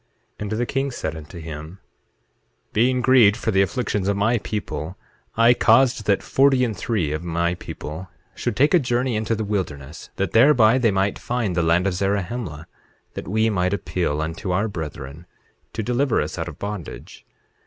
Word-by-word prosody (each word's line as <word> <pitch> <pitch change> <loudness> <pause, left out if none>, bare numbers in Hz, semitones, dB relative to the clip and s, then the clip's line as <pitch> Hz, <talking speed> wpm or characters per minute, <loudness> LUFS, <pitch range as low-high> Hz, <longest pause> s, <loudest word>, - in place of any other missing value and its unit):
8:7 - - -17
And 105 0 -4
the 120 +3 0
king 135 +3 -1
said 120 - -4
unto 80 +3 -10
him: 80 +2 -8 1.0
Being 125 +3 +2
grieved 120 -5 +5
for 110 - -1
the 95 -1 +3
afflictions 105 -2 -1
of 100 0 +1
my 110 +4 +2
people, 95 -6 -5 0.4
I 115 +1 +6
caused 120 -1 +3
that 100 -2 +2
forty 135 -1 +3
and 110 -3 -3
three 95 -7 -1
of 75 +2 -3
my 85 0 0
people 85 0 -8 0.2
should - - -3
take 145 +6 +3
a 180 - +6
journey 125 -2 0
into 110 +1 0
the 110 - -3
wilderness, 80 -8 -4
that 100 - -2
thereby 120 -1 +5
they 120 -3 +3
might 95 0 0
find 120 -7 -2
the 85 - +2
land 85 +2 +2
of 100 - +1
Zarahemla, 95 -3 -2 0.5
that - - -7
we 110 +4 +1
might 90 -1 +1
appeal 80 -6 -2
unto 80 +4 -5
our 100 +5 +1
brethren 75 -3 -7 0.5
to 110 - -3
deliver 125 +2 +1
us - - -3
out - - -3
of - - -8
bondage. 100 -5 -7
100 Hz, 180 wpm, -22 LUFS, 85-120 Hz, 1.0 s, I